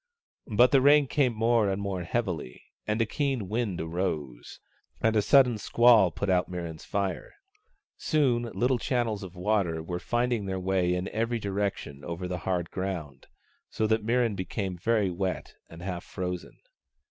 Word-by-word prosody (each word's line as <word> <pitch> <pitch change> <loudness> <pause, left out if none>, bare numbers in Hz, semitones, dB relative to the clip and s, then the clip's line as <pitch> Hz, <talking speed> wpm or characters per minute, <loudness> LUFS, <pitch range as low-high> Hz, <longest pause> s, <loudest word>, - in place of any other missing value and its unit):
But 120 +4 +5
the 135 - +5
rain 145 +1 +6
came 130 -3 +1
more 115 -1 +3
and 95 0 -1
more 100 -2 -3
heavily 85 - -3 0.2
and 105 +1 0
a 115 - +3
keen 135 -3 -1
wind 105 -3 -2
arose; 80 -7 -4 0.4
and 110 0 +2
a 105 - +4
sudden 125 -1 +5
squall 115 -3 +5
put 100 +5 -4
out 90 -1 +2
Mirran's 85 -3 -6
fire. 100 -3 -3 0.6
Soon, 120 -6 +1
little 125 0 +1
channels 120 -5 -1
of 95 -2 -9
water 90 -4 0
were 90 +1 -4
finding 120 -2 -1
their 95 0 -2
way 90 -1 +1
in 90 +1 -2
every 115 +2 -1
direction 100 -9 -3
over 85 +6 -4
the 90 0 -3
hard 90 -2 -1
ground, 90 -7 -5 0.4
so 110 - -1
that 110 0 +1
Mirran 115 -1 +1
became 95 0 -3
very 105 +1 +1
wet 90 +1 -3 0.2
and 85 +1 -11
half 90 -2 -4
frozen. 90 -1 -5
100 Hz, 160 wpm, -28 LUFS, 90-115 Hz, 0.6 s, rain